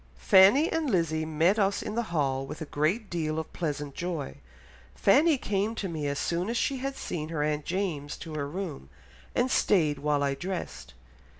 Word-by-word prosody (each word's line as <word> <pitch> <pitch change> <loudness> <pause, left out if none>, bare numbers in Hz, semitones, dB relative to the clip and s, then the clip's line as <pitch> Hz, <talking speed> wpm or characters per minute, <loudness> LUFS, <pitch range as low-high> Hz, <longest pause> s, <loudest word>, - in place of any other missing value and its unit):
Fanny 190 - +6
and 325 -3 0
Lizzy 160 -6 +1
met 165 +7 +2
us 200 0 +1
in 210 - -4
the 235 - 0
hall 135 -5 0
with 155 - -7
a 160 - -4
great 160 +10 0
deal 160 -3 -2
of 160 -1 -5
pleasant 145 -4 -3
joy.... 165 - -4 0.6
Fanny 295 +9 +4
came 210 -1 -1
to 200 - -3
me 155 -4 -3
as 140 0 -2
soon 175 +6 -1
as 235 - -1
she 275 +2 0
had 270 +1 -3
seen 155 - -4
her 155 -3 -1
aunt 150 0 -1
James 170 -6 -2
to 160 - -8
her 145 -2 -2
room, 160 - -6 0.5
and 255 +1 +1
stayed 155 -8 +2
while 145 0 +1
I 140 -1 +1
dressed 135 - -6
165 Hz, 190 wpm, -28 LUFS, 150-200 Hz, 0.6 s, Fanny